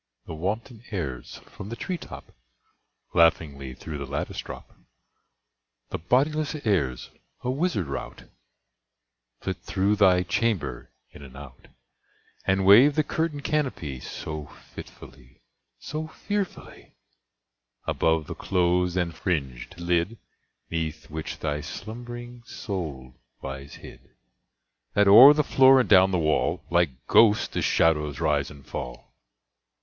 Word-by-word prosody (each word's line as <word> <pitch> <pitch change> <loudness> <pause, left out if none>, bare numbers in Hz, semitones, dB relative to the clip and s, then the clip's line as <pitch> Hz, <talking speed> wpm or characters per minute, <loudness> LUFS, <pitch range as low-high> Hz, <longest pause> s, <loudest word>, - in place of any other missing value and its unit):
The - - -7
wanton 105 - -4
airs, 70 - -5
from 95 - -10
the 115 - -5
tree 180 +8 -4
top, - - -11 0.8
Laughingly 70 -6 +2
through 75 +1 -7
the 70 - -5
lattice 70 +2 -4
drop— - - -9 1.2
The - - -3
bodiless 145 - +1
airs, 70 - 0 0.3
a 125 - 0
wizard 145 - -1
rout, 70 -1 -6 1.2
Flit - - -3
through 100 +3 0
thy 90 -3 +5
chamber 90 - -1 0.2
in - - -13
and 65 -2 -12
out, 70 -4 -12 0.8
And 95 0 +2
wave 125 +9 +7
the 155 - +2
curtain 155 -1 -2
canopy 130 - -2
So 75 +3 -7 0.3
fitfully—so 65 - -10
fearfully— 205 +4 -5 0.9
Above 80 -1 +1
the - - -6
closed 90 -1 0
and 85 -2 0
fringèd 75 -7 -3
lid 85 +5 0 0.5
'Neath 80 -2 -4
which 80 0 -5
thy 75 -1 -2
slumb'ring 120 +7 -8
soul 75 - -6 0.3
lies 70 +1 -7
hid, - - -14 0.8
That 100 0 +4
o'er 125 +9 +10
the 150 - +2
floor 135 -1 +6
and 125 - +1
down 95 -1 +6
the 95 - 0
wall, 80 -2 0
Like 85 -7 +1
ghosts 110 -2 +5
the - - -3
shadows 75 -3 +2
rise 75 -2 +1
and 70 -2 -14
fall! - - -7
90 Hz, 125 wpm, -26 LUFS, 75-115 Hz, 1.2 s, o'er